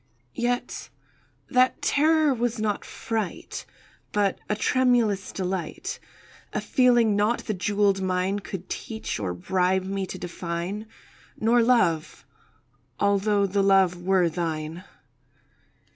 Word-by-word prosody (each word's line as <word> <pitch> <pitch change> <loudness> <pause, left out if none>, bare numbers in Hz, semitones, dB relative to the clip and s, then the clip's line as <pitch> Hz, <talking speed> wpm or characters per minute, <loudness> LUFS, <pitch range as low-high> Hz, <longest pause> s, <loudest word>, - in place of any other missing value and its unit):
Yet 245 +1 -2 0.6
that 255 0 +3
terror 310 0 +3
was 240 -1 -1
not 210 -2 -1
fright, 220 -5 -4 0.4
But 205 -2 +1
a 210 - +1
tremulous 230 -5 +2
delight— 185 -3 -4 0.5
A - - 0
feeling 240 -4 +3
not 210 +4 +1
the 215 - -2
jewelled 200 0 +1
mine 185 +2 0
Could 190 -1 -7
teach 220 -1 -4
or 90 -4 -2
bribe 185 - +1
me 195 0 -2
to 185 - -6
define— 175 +4 -4 0.5
Nor 235 +2 +4
Love—although 195 - 0
the 200 +1 +1
Love 190 -2 +3
were 185 -1 +3
thine. 160 0 -3
195 Hz, 110 wpm, -25 LUFS, 180-225 Hz, 0.6 s, Nor